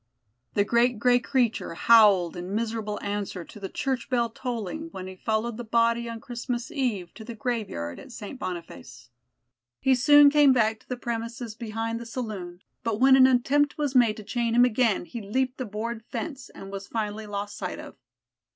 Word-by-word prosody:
The 205 - +4
great 235 +2 +2
gray 245 +2 +4
creature 245 -8 0
howled 200 -5 +5
in 180 +3 -5
miserable 220 -2 -2
answer 200 -3 -3
to - - -13
the 195 -1 -5
church 260 -3 -2
bell 235 -3 +1
tolling 245 - -5
when 185 - -7
he 190 0 -8
followed 220 +3 -2
the 240 - -5
body 235 +1 +1
on 230 -1 -6
Christmas 240 +3 -5
Eve 240 - -2
to 220 - -10
the 230 +1 -8
graveyard 210 - -3
at - - -12
St. 235 +3 -8
Boniface. 170 - -8 0.7
He 265 - +3
soon 290 +3 +7
came 290 -2 +6
back 220 -3 +2
to - - -27
the 250 - -3
premises 230 -1 -4
behind 225 0 -4
the 235 - -8
saloon, 200 -7 -6 0.2
but 225 -2 -2
when 265 +1 +7
an 260 -1 +7
attempt 275 +3 +2
was 290 -3 -1
made 240 -4 +4
to 215 - -8
chain 235 +2 -1
him 245 +1 +7
again, 230 -5 +1
he 235 +5 -7
leaped 255 +6 -1
a - - -2
board 220 +2 -5
fence 280 -5 -5
and 195 - -10
was 195 0 -6
finally 215 -1 -3
lost 205 0 -4
sight - - -5
of. - - -10
230 Hz, 190 wpm, -26 LUFS, 210-250 Hz, 0.7 s, soon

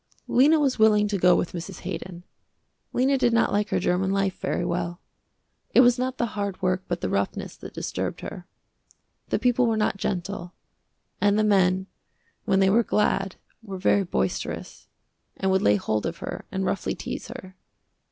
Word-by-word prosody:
Lena 295 +6 +5
was 275 -5 +1
willing 210 -1 +5
to 200 -2 -1
go 180 0 +6
with 175 - -1
Mrs. 180 +2 -7
Haydon. 175 0 -6 0.7
Lena 265 +2 +2
did 240 -2 +3
not 230 - +3
like 205 0 0
her - - +1
german 180 +2 +1
life 195 -1 0
very 175 - -1
well. 175 +1 -2 0.8
It - - +9
was 245 0 +5
not 255 0 -2
the 240 - +1
hard 200 -2 -3
work 185 0 0
but - - -3
the - - -1
roughness - - -2
that - - -10
disturbed - - -3
her. - - -8 0.8
The - - +1
people 250 -1 +2
were 225 -1 +1
not 210 -2 +1
gentle, 180 -1 -4 0.7
and 205 0 +3
the 215 - +3
men 190 -2 +3 0.6
when 195 -3 +3
they 190 - +5
were 230 +4 +5
glad 195 -3 0 0.3
were 200 -4 -7
very 195 +2 +3
boisterous, 180 - -3 0.5
and 190 0 0
would 190 - +3
lay 105 - +4
hold 105 +4 -1
of 165 0 -5
her - - -6
and 190 0 -2
roughly 195 - -1
tease - - -6
her. 185 0 -10
195 Hz, 180 wpm, -25 LUFS, 185-220 Hz, 0.8 s, It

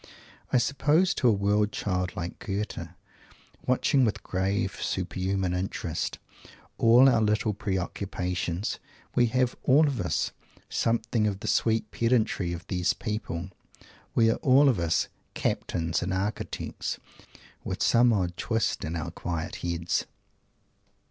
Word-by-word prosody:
I - - +4
suppose 145 +8 +3
to 125 - +1
a - - +7
world 105 +1 +2
child 90 -3 -2
like 85 0 -5
Goethe, 100 -4 -3 0.8
watching, 130 +1 +3
with 110 -3 0
grave 95 +2 -1
super 95 0 -2
human 95 -1 0
interest, 90 -3 -3 0.6
all 120 +4 +7
our 120 -4 +4
little 105 0 +1
pre 100 -1 -2
occupations, 90 0 -3 0.3
we 120 -1 +4
have 125 +1 +1
all 145 +4 +5
of 140 -4 -1
us - - 0 0.4
something 115 -1 +1
of 100 -1 -3
the 110 - -5
sweet 110 -2 +1
pedantry 110 -3 +1
of 85 0 -6
these 90 -1 +1
people 100 -4 -4 0.6
we 115 -1 +5
are - - -1
all 135 +2 +5
of 115 -8 +1
us 85 -1 +1 0.3
"Captains" 85 -1 -1
and 90 - -2
"Architects" 100 +3 -3 0.7
with - - -2
some 120 +1 +5
odd 90 -5 0
twist 115 -1 -1
in 80 +2 -3
our 85 0 -3
quiet 85 -1 -4
heads. 85 0 -1
100 Hz, 135 wpm, -27 LUFS, 90-115 Hz, 0.8 s, a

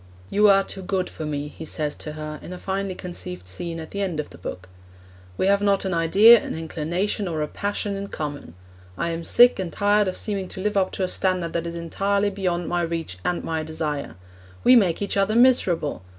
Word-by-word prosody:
'You 210 +1 +5
are 195 0 +5
too 190 - -6
good 185 0 -2
for 155 - -6
me,' 145 -1 -3
he 155 - -10
says 150 -1 -2
to 150 - -6
her 155 0 -6
in 180 - -8
a - - -7
finely 195 0 -3
conceived 90 - -7
scene 165 - -4
at 160 - -8
the 200 - -3
end 180 -6 -2
of 150 - -4
the 85 - -13
book; 90 +1 -7 0.7
'we - - +1
have 200 +1 +3
not 200 -1 +2
an 190 - -1
idea, 200 +8 +7
an - - -5
inclination, 170 +6 -2
or 160 -3 -2
a - - -2
passion 205 +3 -3
in 200 0 -5
common. 145 - -6 0.4
I'm 170 0 -2
sick 240 +6 +5
and 180 -3 -3
tired 205 +3 +2
of 185 - -3
seeming 200 -3 -2
to - - -9
live 210 +2 -1
up 190 -1 +2
to 190 - -2
a - - +1
standard 180 -3 0
that 170 0 -2
is 170 - -5
entirely 200 +4 0
beyond 180 -3 -2
my 175 0 0
reach 165 - -4
and 180 - -1
my 160 -1 -2
desire. 155 -2 -4 0.5
We 250 - +7
make 195 -5 +3
each 200 - -2
other 200 +2 +2
miserable! 195 - +3
180 Hz, 220 wpm, -24 LUFS, 160-200 Hz, 0.7 s, idea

